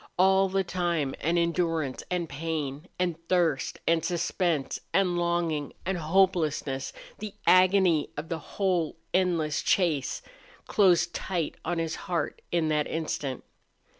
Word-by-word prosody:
All 190 +1 +4
the 195 +1 +1
time 170 -6 -1
and 165 +4 +1
endurance 165 -5 0
and 180 -2 -1
pain 150 0 -4
and 175 -3 -1
thirst 170 -6 +1
and 165 -1 +3
suspense 170 -3 -1
and 185 -2 +2
longing 170 -4 0
and 190 +1 0
hopelessness 155 -6 +1 0.3
the 210 -1 -6
agony 185 -3 +5
of 150 +2 -4
the 165 -1 -3
whole 175 -1 -1 0.2
endless 175 -5 +1
chase 160 -8 +1 0.4
closed 175 -4 +3
tight 175 -5 -2
on 175 +1 -2
his 165 -1 -1 0.2
heart 175 -2 -2
in 170 -2 +1
that 150 -1 +1
instant. 150 -5 -3
170 Hz, 130 wpm, -28 LUFS, 155-180 Hz, 0.4 s, agony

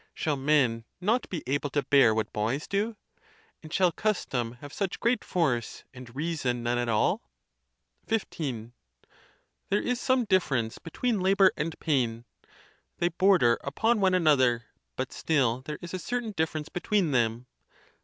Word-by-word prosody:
Shall 155 -2 0
men 135 -5 +2 0.2
not 220 +7 0
be 175 - -4
able 145 +3 -1
to 145 +1 0
bear 130 -5 +5
what 110 -1 -2
boys 115 +8 -1
do? 210 +3 -1 0.7
and 155 - -11
shall 180 +1 +3
custom 135 - -1
have 145 +4 -11
such 195 -3 -3
great 235 -1 +1
force, 135 -10 -1
and 125 -1 -12
rea 165 +4 -2
son 125 -5 -2
none 120 +1 0
at 120 -1 -1
all? 110 -2 +2 0.9
XV. 135 - -2 1.0
There 205 - +2
is 245 +2 -2
some 255 -2 +2
difference 140 - +1
between 225 +6 -2
labor 190 0 +5
and 160 +1 -4
pain; 120 -6 0 0.7
they 175 0 +1
border 175 -9 +4
upon 220 +11 +1
one 190 -2 +3
another, 130 -9 +3 0.3
but 130 0 -4
still 130 -6 +1
there 150 - -4
is 175 - -7
a 185 - -2
certain 245 +3 -3
difference 160 -4 -2
between 180 -2 0
them. 120 -1 +1
150 Hz, 155 wpm, -28 LUFS, 120-190 Hz, 1.0 s, bear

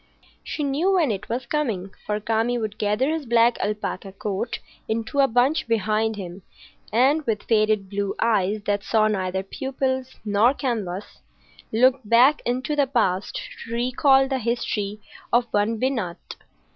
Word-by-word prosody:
She 300 - -4
knew 295 +8 +1
when 330 -9 +3
it 200 -1 -5
was 240 +3 -2
coming; 220 -11 -2 0.2
for 210 0 0
Kami 225 +3 0
would 215 -2 -4
gather 210 +8 +1
his 320 -4 -3
black 235 0 +4
alpaca 210 -1 -3
coat 200 +3 -3 0.3
into 230 +5 -2
a 275 - +6
bunch 255 +6 +2
behind 220 0 +1
him, 185 -1 -7 0.5
and, 270 +8 +3
with 215 -2 -1
faded 215 -3 +2
blue 200 0 -2
eyes 210 -2 +1
that 205 -1 -1
saw 215 +1 +3
neither 190 -2 -1
pupils 260 +4 -3
nor 215 +6 +3
canvas, 210 -9 -4 0.5
look 255 +4 +4
back 245 +7 +5
into 260 +4 -1
the 285 -2 +2
past 210 -7 0 0.3
to 230 - -6
recall 265 +3 +3
the 265 -1 -1
history 215 -3 -2 0.3
of 240 0 +4
one 210 +2 +1
Binat. 230 -10 -1
230 Hz, 150 wpm, -24 LUFS, 205-260 Hz, 0.5 s, a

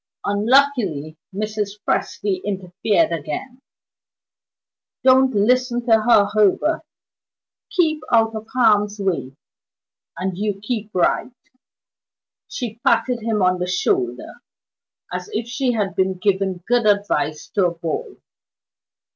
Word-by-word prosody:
Unlucky 205 - +2 0.2
Mrs. 210 0 -3
Presty 195 -3 -1
interfered 195 0 0
again. 170 - -5 1.4
"Don't 260 -1 +5
listen 245 +3 +2
to 240 - -1
her, 220 -2 +5
Herbert. 215 - +2 0.9
Keep 320 -5 +1
out 225 -1 +3
of 220 0 -6
harm's 210 -4 +3
way, 175 -9 -2 0.8
and 185 0 -3
you 205 +1 -2
keep 215 0 -4
right." 180 - +1 1.2
She 230 -3 -6
patted 250 -2 +2
him 215 -3 0
on 185 0 +2
the 180 - -2
shoulder, 125 -9 -1 0.7
as 180 0 -5
if 225 +2 -2
she 250 0 -1
had 205 -4 -2
been 190 0 +1
giving 190 -2 0
good 240 -2 +2
advice 200 -7 0
to 195 -3 +2
a - - -2
boy. 165 -2 -4
210 Hz, 115 wpm, -21 LUFS, 185-240 Hz, 1.4 s, Don't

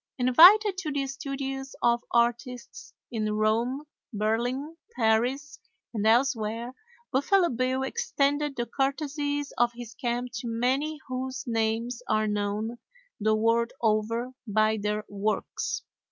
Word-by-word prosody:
Invited 370 - +7
to 310 -5 -3
the 280 -1 -1
studios 270 0 -5
of 235 0 +3
artists 245 +8 -1 0.2
in 215 -2 -1
Rome, 230 +6 +1 0.3
Berlin, 240 +8 -1 0.2
Paris, 245 +5 +1 0.3
and 215 -1 0
elsewhere, 230 -1 +1 0.4
Buffalo 345 +7 +3
Bill 255 +2 0
extended 285 +2 0
the 240 - -2
courtesies 285 +2 -2
of 240 0 +3
his 240 -1 -9
camp 245 0 -2
to 235 - -6
many 265 +7 0
whose 260 +1 -4
names 230 +1 -1
are 215 0 +2
known 210 +3 -2 0.4
the 215 +1 +2
world 230 +2 +2
over 230 +2 0 0.2
by 215 +1 +2
their 210 +1 -2
works. 205 +1 -2
245 Hz, 120 wpm, -27 LUFS, 220-275 Hz, 0.4 s, Invited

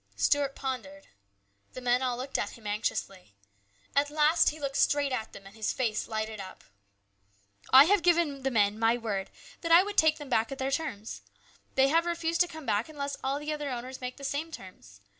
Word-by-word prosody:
Stuart 285 -1 +1
pondered. 220 -8 -5 0.7
The - - -6
men 245 0 +1
all 250 -2 -1
looked 260 +2 -3
at - - -4
him 225 - -18
anxiously. 195 - -3 0.6
At 285 +1 +3
last 305 +2 +4
he 310 - -8
looked 280 -1 -3
straight 285 -1 +2
at 225 -4 -3
them 195 - -12
and 195 +2 -13
his 220 -2 -1
face 225 -5 -1
lighted 220 -1 -4
up. 190 -1 -9 0.6
" 100 0 -38 0.2
I 265 +1 +10
have 390 +5 +3
given 335 -5 +2
the 270 - 0
men 210 -3 +2
my 230 +1 +3
word 205 -5 -3 0.3
that 335 - -2
I 340 +2 +8
would 410 +1 -6
take 315 -1 +4
them 295 - -9
back 225 -2 +1
at 275 - -5
their 270 0 -2
terms. 250 -9 -4 0.5
They 270 0 +4
have 330 +3 +2
refused 335 0 0
to 355 - +4
come 315 -3 -10
back 210 +5 0
unless 280 -2 -4
all 270 +1 0
the 295 +1 -3
other 295 -1 -4
owners 255 +1 -6
make 250 0 -5
the 280 - -12
same 295 +4 -3
terms. 100 - -12
265 Hz, 210 wpm, -29 LUFS, 220-295 Hz, 0.7 s, I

